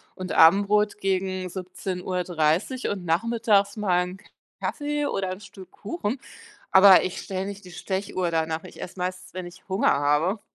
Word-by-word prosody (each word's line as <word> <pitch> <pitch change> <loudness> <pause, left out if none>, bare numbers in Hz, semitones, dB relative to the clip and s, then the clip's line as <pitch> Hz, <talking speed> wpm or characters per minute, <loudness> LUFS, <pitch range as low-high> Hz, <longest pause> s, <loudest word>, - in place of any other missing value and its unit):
und 185 -1 -6
Abendbrot 205 +5 +5
gegen 185 -1 -1
17:30 180 - -2
und 190 -3 -4
nachmittags 205 +3 +2
mal 180 -4 +2
'n 180 +1 -7 0.4
Kaffee 295 0 -2
oder 190 -1 -2
'n 185 - -6
Stück 190 -2 -13
Kuchen, 245 0 -4 0.5
aber 190 -1 +8
ich 185 - -4
stelle 190 0 -4
nicht 200 0 -8
die 180 - -12
Stechuhr 185 -1 -2
danach. 160 0 -1
Ich - - -12
esse 180 - -8
meistens, 185 +1 -5
wenn 185 -1 -5
ich 175 +3 -14
Hunger 190 +1 +2
habe. 150 +8 +1
185 Hz, 155 wpm, -25 LUFS, 180-200 Hz, 0.5 s, aber